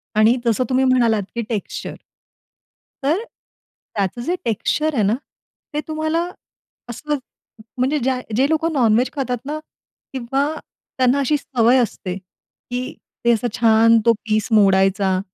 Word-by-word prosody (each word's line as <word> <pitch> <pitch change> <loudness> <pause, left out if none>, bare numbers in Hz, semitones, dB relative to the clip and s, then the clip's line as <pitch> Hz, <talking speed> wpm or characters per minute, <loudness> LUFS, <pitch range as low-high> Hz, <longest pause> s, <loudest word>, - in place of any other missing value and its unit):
आणि 215 +3 +5
जसं 230 +1 +2
तुम्ही 260 0 +2
म्हणालात 235 -5 +3
की 235 - -1
टेक्स्चर 215 -4 -4 1.1
तर, 320 +10 +1 0.7
त्याचं 200 +3 -1
जे 350 - 0
टेक्स्चर 300 +7 0
आहे 220 - +1
ना, 200 +2 +2 0.6
ते 295 - -1
तुम्हाला 315 +1 -1 0.7
असं 295 +5 -3 0.6
म्हणजे 260 +4 +1
ज्या 260 0 +1 0.2
जे 265 +4 +3
लोकं 320 +1 +1
नॉन-व्हेज 240 -2 +3
खातात 255 -4 -2
ना 300 +2 -3 0.5
किंवा 270 +2 0 0.5
त्यांना 255 +1 +3
अशी 290 +2 +2
सवय 250 -2 +2
असते, 205 -6 -1
की 245 +6 -8 0.3
ते 235 - +6
असा 230 +1 0
छान 230 0 +5
तो 230 - +6
पीस 215 -1 0
मोडायचा 195 -2 +3
245 Hz, 135 wpm, -20 LUFS, 220-275 Hz, 1.1 s, ते